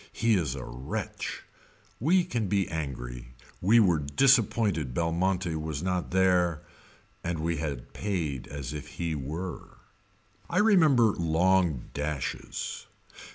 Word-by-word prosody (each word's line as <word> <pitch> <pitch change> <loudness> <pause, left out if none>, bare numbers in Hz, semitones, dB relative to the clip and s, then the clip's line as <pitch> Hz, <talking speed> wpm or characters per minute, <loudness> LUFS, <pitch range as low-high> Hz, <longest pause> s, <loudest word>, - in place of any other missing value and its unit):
He 115 -1 +2
is 80 -9 +1
a 65 - -6
wretch. 60 +2 -5 0.6
We 175 +8 +4
can 120 - -2
be 100 -1 +1
angry. 60 -6 -5 0.3
We 110 +6 +5
were 90 -7 +4
disappointed 100 - +2
Belmonte 85 +2 0
was 80 -1 -3
not 90 -1 -1
there 90 -4 +2 0.6
and 85 -1 -2
we 80 +1 -1
had 75 -5 -5
paid 85 -10 -2
as 70 -1 -6
if 75 0 -6
he 85 -2 -1
were. 80 +5 -6 0.7
I 180 - -1
remember 160 - +5
long 85 -3 +1
dashes. 75 -2 -4
85 Hz, 120 wpm, -28 LUFS, 75-95 Hz, 0.7 s, We